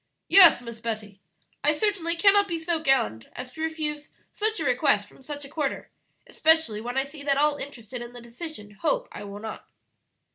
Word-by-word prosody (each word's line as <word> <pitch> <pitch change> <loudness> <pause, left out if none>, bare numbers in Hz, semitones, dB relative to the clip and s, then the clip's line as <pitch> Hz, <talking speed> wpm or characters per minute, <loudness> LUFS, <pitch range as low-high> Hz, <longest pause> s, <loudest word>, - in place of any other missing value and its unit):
"Yes, 355 -8 +9
Miss 235 -1 -8
Betty; 215 -3 -5 0.4
I 300 - +4
certainly 350 -4 0
cannot 405 +3 +5
be 340 -3 -2
so 325 0 -1
gallant 115 - +1
as 250 0 -7
to 315 - -9
refuse 305 -2 -3 0.2
such 435 0 0
a 320 - -2
request 230 -5 +2
from - - -19
such 290 +1 -7
a - - -9
quarter, 290 -1 -3 0.3
especially 320 -10 +2
when 245 +3 -4
I 270 - +3
see 285 +2 -11
that 280 -1 +1
all 295 0 +2
interested 250 -4 -7
in 240 0 -8
the 245 - -10
decision 235 -2 -8
hope - - -1
I - - -8
will 200 0 -8
not." 220 +1 -8
285 Hz, 190 wpm, -26 LUFS, 235-320 Hz, 0.4 s, Yes